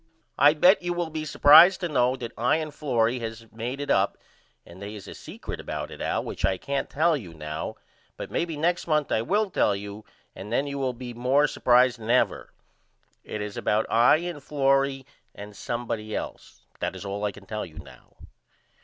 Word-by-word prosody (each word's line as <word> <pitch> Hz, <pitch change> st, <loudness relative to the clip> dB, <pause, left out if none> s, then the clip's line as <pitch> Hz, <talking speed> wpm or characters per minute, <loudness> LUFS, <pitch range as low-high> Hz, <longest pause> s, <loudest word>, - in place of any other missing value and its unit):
I 145 Hz, +2 st, +6 dB
bet 180 Hz, +6 st, +5 dB
you 175 Hz, 0 st, -2 dB
will 175 Hz, -2 st, -3 dB
be 155 Hz, 0 st, -4 dB
supprised 160 Hz, +5 st, +7 dB
to 175 Hz, -, 0 dB
know 130 Hz, -4 st, +2 dB
that 120 Hz, -3 st, -7 dB
I 120 Hz, +5 st, +2 dB
and 155 Hz, -2 st, -3 dB
Florrie 125 Hz, -5 st, 0 dB
has 115 Hz, -1 st, -6 dB
made 120 Hz, +4 st, -5 dB
it 145 Hz, -, -2 dB
up 95 Hz, +1 st, +2 dB, 0.5 s
and 90 Hz, +3 st, -14 dB
they 100 Hz, +2 st, -7 dB
is 100 Hz, -, -10 dB
a -, -, -8 dB
secret -, -, -8 dB
about -, -, -5 dB
it -, -, -9 dB
Al -, -, -1 dB
which -, -, -7 dB
I 95 Hz, -, +2 dB
can't 140 Hz, +7 st, -3 dB
tell 160 Hz, +3 st, +2 dB
you 90 Hz, -, -8 dB
now 75 Hz, +1 st, -5 dB, 0.4 s
but -, -, -7 dB
maybe 165 Hz, -3 st, -2 dB
next 175 Hz, +4 st, 0 dB
month 150 Hz, -3 st, +1 dB
I 110 Hz, -, +2 dB
will 205 Hz, -, 0 dB
tell 100 Hz, -, +2 dB
you 100 Hz, +1 st, -8 dB, 0.3 s
and 105 Hz, +3 st, -9 dB
then 135 Hz, +4 st, +1 dB
you 140 Hz, -1 st, -4 dB
will 130 Hz, -2 st, -1 dB
be 120 Hz, 0 st, -8 dB
more 130 Hz, +5 st, +2 dB
supprised 125 Hz, -2 st, +3 dB
than 110 Hz, 0 st, -8 dB
ever. 125 Hz, +1 st, +1 dB, 0.7 s
It 105 Hz, -, -6 dB
is 105 Hz, -1 st, -7 dB
about 110 Hz, +1 st, +1 dB
I 120 Hz, +4 st, +6 dB
and 170 Hz, -2 st, -5 dB
Florrie 135 Hz, -1 st, +1 dB, 0.3 s
and 105 Hz, 0 st, -10 dB
somebody 115 Hz, -1 st, -4 dB
else. -, -, -7 dB
But -, -, -31 dB
that -, -, -2 dB
is -, -, -8 dB
all 100 Hz, +1 st, -4 dB
I 105 Hz, -, 0 dB
can 100 Hz, 0 st, -15 dB
tell 105 Hz, +1 st, -4 dB
you 80 Hz, -3 st, -11 dB
now. -, -, -14 dB
125 Hz, 205 wpm, -26 LUFS, 105-150 Hz, 0.7 s, supprised